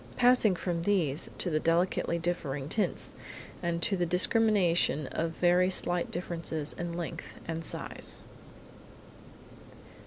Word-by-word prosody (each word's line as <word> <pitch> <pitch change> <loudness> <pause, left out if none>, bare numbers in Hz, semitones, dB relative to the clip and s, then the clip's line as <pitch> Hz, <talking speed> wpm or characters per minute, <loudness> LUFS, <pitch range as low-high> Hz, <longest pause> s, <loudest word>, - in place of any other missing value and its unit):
passing 245 -5 +5
from 175 -1 -2
these 170 -7 0
to 180 - -2
the 155 - +2
delicately 170 +1 +1
differing 150 -5 -2
tints, 210 +7 -1 0.5
and 170 -1 -1
to 200 - +2
the 180 - 0
discrimination 180 - +3
of 165 +1 -1
very 180 +1 +3
slight 175 -2 +1
differences 165 -3 -3
in 175 0 -4
length 170 -1 -6
and 165 0 -3
size. - - -7
175 Hz, 120 wpm, -30 LUFS, 165-185 Hz, 0.5 s, passing